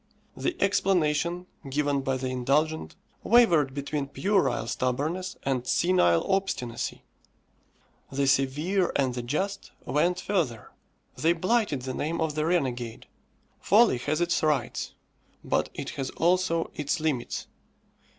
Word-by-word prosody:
The 355 - -2
explanation 175 -3 +1 0.2
given 145 0 0
by 135 -1 -1
the 130 0 -3
indulgent, 140 +5 0 0.3
wavered 170 - +4
between 140 0 -3
puerile 195 - +1
stubbornness 150 +11 -2
and 130 -2 -1
senile 170 - +3
obstinacy. 190 -12 -2 1.1
The 140 +1 0
severe 145 +8 +1
and 130 -3 +1
the 120 - -3
just 190 +11 -3
went 175 +5 +1
further; 125 - -2 0.4
they 165 +2 +2
blighted 185 - 0
the 130 0 -4
name 165 +5 -2
of 160 -2 0
the 155 +1 -1
renegade. 125 -9 -1 0.5
Folly 210 - +4
has 155 +6 -1
its 175 0 +1
rights, 150 -6 -1 0.5
but - - 0
it - - -5
has 135 -2 -4
also 175 -1 +1
its 150 +3 -2
limits. 155 -6 -2
150 Hz, 120 wpm, -27 LUFS, 135-180 Hz, 1.1 s, wavered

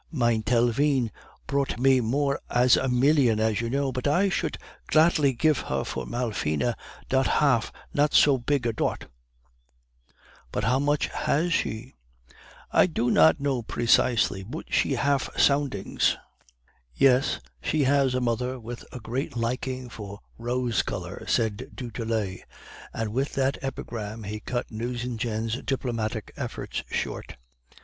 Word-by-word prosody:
Mein 120 -7 +2
Telvine 120 +2 +2 0.3
prouht 140 -1 -1
me 130 +1 +4
more 140 +4 0
as 125 0 +5
a 130 - 0
million, 125 -3 +3
as 110 0 +1
you 115 - -2
know, 140 +1 0
but 125 +2 -2
I 180 +7 +3
should - - -1 0.3
gladly 155 -3 +4
gif 155 +3 +2
her - - -2
for - - -5
Malfina 115 -4 -1 0.3
dot 135 0 +2
haf 135 -6 +2 0.2
not 145 +1 +2
so 140 -3 +6
pig 135 +1 0
a 115 - +1
dot.' - - -2 1.5
"'But - - -2
how 125 +3 +2
much 145 +1 +1
has 165 +4 0
she?' 120 -2 -2 0.8
"'I - - +5
do 125 -8 0
not 80 0 +5
know 140 -3 0
precisely; 115 -3 +2
boot 100 +6 -8
she - - +2
haf 140 -1 +1
somdings.' 140 -8 +2 0.8
"'Yes, 135 0 +3 0.2
she 155 -2 +1
has 135 -1 +3
a - - +1
mother 125 +2 -1
with 120 +1 -8
a 125 - -7
great 125 +2 -4
liking 125 +2 -2
for 105 -3 -8 0.2
rose 120 -1 0
color.' - - -6
said 110 -3 0
du 120 -3 -6
Tillet; 110 -4 -2 0.5
and 110 -2 -3
with 135 +4 -1
that 135 0 +1
epigram 110 -4 -5
he 105 +2 -5
cut 120 +3 -4
Nucingen's 115 0 -3
diplomatic 115 -5 -3
efforts - - -4
short. - - -4
125 Hz, 140 wpm, -26 LUFS, 115-140 Hz, 1.5 s, so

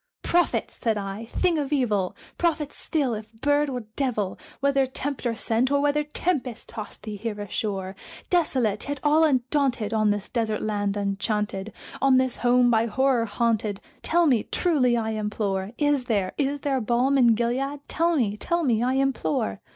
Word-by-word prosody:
"Prophet!" 350 0 +1
said 225 -3 -1
I, 200 +2 -5
"thing 330 +7 +1
of 285 -1 -3
evil! 215 -10 +1 0.2
prophet 315 -4 0
still, 280 -7 -1
if 215 0 -7
bird 290 +5 +1
or 250 -2 -3
devil! 225 -9 -1 0.2
Whether 275 -1 +2
Tempter 260 -3 -3
sent, 235 +2 0
or 285 0 +2
whether 290 +1 +2
tempest 295 -5 -2
tossed 215 -2 -8
thee 215 -1 -5
here 210 0 -4
ashore, 195 -1 -3 0.4
Desolate 260 - +1
yet 285 -1 -2
all 305 +2 +4
undaunted, 260 -5 +1
on 215 -1 +3
this 205 -1 -1
desert 220 -3 -1
land 205 -1 -1
enchanted 205 0 -2 0.3
On 270 -1 +5
this 260 -1 +1
home 245 0 +4
by 225 0 +3
Horror 260 0 +2
haunted 215 -2 0 0.2
tell 345 +1 +3
me 250 -8 +4
truly, 260 - +1
I 220 -1 -1
implore 210 -2 -2
Is 290 -3 +1
there 200 -6 0
is 285 0 -1
there 270 -3 0
balm 245 +4 +2
in 240 -4 +5
Gilead? 265 +5 -1
tell 335 +1 +1
me 220 -8 +1
tell 340 +10 -1
me, 235 -6 +2
I 250 +2 +1
implore!" 250 - 0
245 Hz, 165 wpm, -25 LUFS, 215-280 Hz, 0.4 s, On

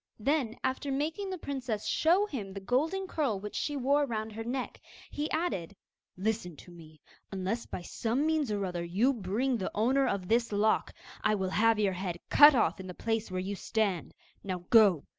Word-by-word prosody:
Then, 255 -1 0
after 265 +2 -1
making 315 +8 -2
the 375 - -4
princess 255 -9 -4
show 355 +6 +3
him 225 - -6
the 195 - -5
golden 305 - 0
curl 280 - -1
which 210 +1 -7
she 290 -1 -2
wore 280 +2 +2
round 220 -2 -3
her 225 +1 -6
neck, 250 +2 -4 0.3
he 295 +1 -3
added: 200 - -2 0.4
'Listen 195 -4 -2
to 175 - -14
me; 155 -3 -14 0.3
unless 195 +4 -3
by 175 - -6
some 235 +10 -1
means 310 -6 +1
or 200 -1 -1
other 175 -2 -3
you 205 +11 +2
bring 225 +4 -1
me 245 - +1
the 190 - -3
owner 260 +6 +2
of 190 -2 -2
this 230 +2 +2
lock, 210 +1 +1 0.3
I 215 - +3
will 190 -2 -2
have 225 +2 +3
your 205 -3 +1
head 180 -2 -4
cut 295 -1 +9
off 180 -8 +2
in 190 - -7
the 180 - -8
place 225 -1 -2
where 185 0 -3
you 195 +2 -3
stand. 200 -4 -1 0.3
Now 180 -3 -4
go! 205 - +6
220 Hz, 200 wpm, -30 LUFS, 190-275 Hz, 0.4 s, cut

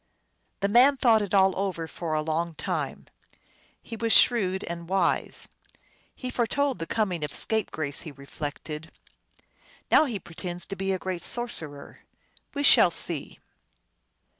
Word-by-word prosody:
The 200 - +2
man 250 +7 +5
thought 230 -4 +4
it 200 -3 -4
all 190 -1 +4
over 185 -4 -2
for 160 -1 -4
a 155 - 0
long 160 +1 -2
time. - - -4 0.8
He 230 - -8
was 230 0 -1
shrewd 195 -7 +4
and 170 0 -7
wise. 190 -3 -1 0.3
" - - -37 0.3
He 255 -1 -6
foretold 260 +3 0
the 165 - -5
coming 190 -8 -1
of 150 - -4
Scapegrace," 160 -10 -2
he 155 - -8
reflected. 145 +2 -7 0.5
" - - -31
Now 315 - +6
he 240 -7 -3
pretends 175 0 -7
to 195 - -6
be 195 0 -4
a - - +2
very - - -18
great 185 -2 -3
sorcerer. 160 -12 -2 0.6
We 285 - -1
shall - - +7
see - - +1
190 Hz, 155 wpm, -26 LUFS, 165-225 Hz, 0.8 s, shall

